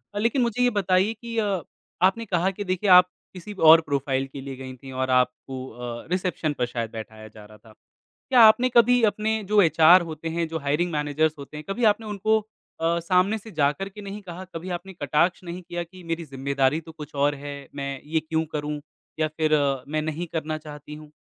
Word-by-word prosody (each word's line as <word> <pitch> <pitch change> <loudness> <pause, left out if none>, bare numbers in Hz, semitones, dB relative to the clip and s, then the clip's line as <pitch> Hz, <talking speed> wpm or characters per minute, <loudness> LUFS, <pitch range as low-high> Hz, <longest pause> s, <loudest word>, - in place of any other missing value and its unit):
अ, - - -1
लेकिन 235 +4 +1
मुझे 240 +1 +1
ये 245 - +5
बताइए 190 +2 +2
कि 230 +1 -8
अ, 200 -5 0 0.5
आपने 230 +4 -2
कहा 185 -2 +1
कि 205 +2 -6
देखिए, 190 +2 0
आप 180 0 +8 0.3
किसी 190 +3 -8
और 165 -3 +7
प्रोफ़ाइल 140 -3 -1
के 135 0 -9
लिए 135 -1 -7
गईं 130 -1 -7
थीं 135 +1 -11
और 130 - -1
आपको 125 +1 -1
अ, 120 0 -7
रिसेप्शन 180 -4 -1
पर - - +4
शायद 115 -2 -3
बैठाया 110 -1 -9
जा 105 - -12
रहा 105 +1 -16
था। 110 +1 -19 0.6
क्या 250 -3 +6
आपने 250 +3 -1
कभी 245 +1 +6
अपने 215 +1 -2 0.2
जो 210 -1 +5
एचआर 165 +2 +6
होते 160 +1 -5
हैं, 170 -1 0
जो 160 0 -4
हायरिंग 150 +5 0
मैनेजर्स 150 +1 0
होते 140 +2 -9
हैं, 150 - -7
कभी 235 +5 -2
आपने 220 +1 -13
उनको 220 +3 +2 0.4
अ, 170 +1 +1
सामने 185 +5 +2
से 220 +1 -12
जाकर 150 +7 +1
के 210 +2 -11
नहीं 200 +1 -7
कहा, 185 -1 -8
कभी 175 +3 -5
आपने 190 +2 -13
कटाक्ष 175 +2 0
नहीं 175 +1 -7
किया 175 0 -5
कि 180 +2 -15
मेरी 165 0 -3
ज़िम्मेदारी 140 +1 0
तो - - -8
कुछ 150 -2 -10
और 145 0 +1
है, 145 0 -6 0.2
मैं 140 -1 -3 0.2
ये 160 - +4
क्यों 160 0 0
करूँ? 150 0 -3 0.4
या 155 - +2
फिर 155 -1 +1 0.4
मैं 155 - +1
नहीं 155 +2 -3
करना 155 -1 -2
चाहती 150 0 -10
हूँ। 150 -1 -15
165 Hz, 210 wpm, -25 LUFS, 145-195 Hz, 0.6 s, आप